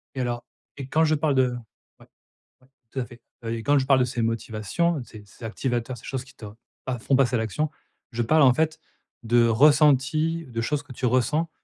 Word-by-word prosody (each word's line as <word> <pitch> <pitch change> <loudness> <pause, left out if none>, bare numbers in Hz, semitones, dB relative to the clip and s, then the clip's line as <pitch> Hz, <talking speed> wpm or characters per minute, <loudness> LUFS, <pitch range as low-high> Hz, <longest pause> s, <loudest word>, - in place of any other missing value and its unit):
Et 130 - -3
alors 120 -1 -2 0.3
et 135 -2 -6
quand 160 +4 +2
je 155 - +3
parle 150 -1 +1
de 130 -1 +3 0.5
ouais, - - -17 0.6
ouais, 130 - -25 0.2
tout 135 - -4
à 120 - -2
fait. 120 -1 -15 0.2
Heu 115 - -3
et 115 -1 -5
quand 145 +3 +3
je 130 - +1
parle 135 -1 +4
de 125 - +3
ces 120 -1 -3
motivations, 115 - -1
de 120 - -8
ces 105 -2 -12
ces 100 +3 -17
activateurs, 120 +2 -3
ces - - -14
choses 130 -2 -4
qui 130 0 -18
te 110 - -11 0.4
pas 125 -3 -3
font 135 - +1
passer 130 -2 +3
à - - +1
l'action, 115 +8 -1 0.4
je 120 - -2
parle 155 +7 +3
en 130 - +7
fait 160 +3 0 0.4
de 120 +1 +4
ressenti, 150 +5 +3
de 115 -2 -4
choses 145 +4 -1
que 135 -3 -12
tu 125 - -3
ressens, 145 +7 +1
130 Hz, 225 wpm, -25 LUFS, 120-145 Hz, 0.6 s, en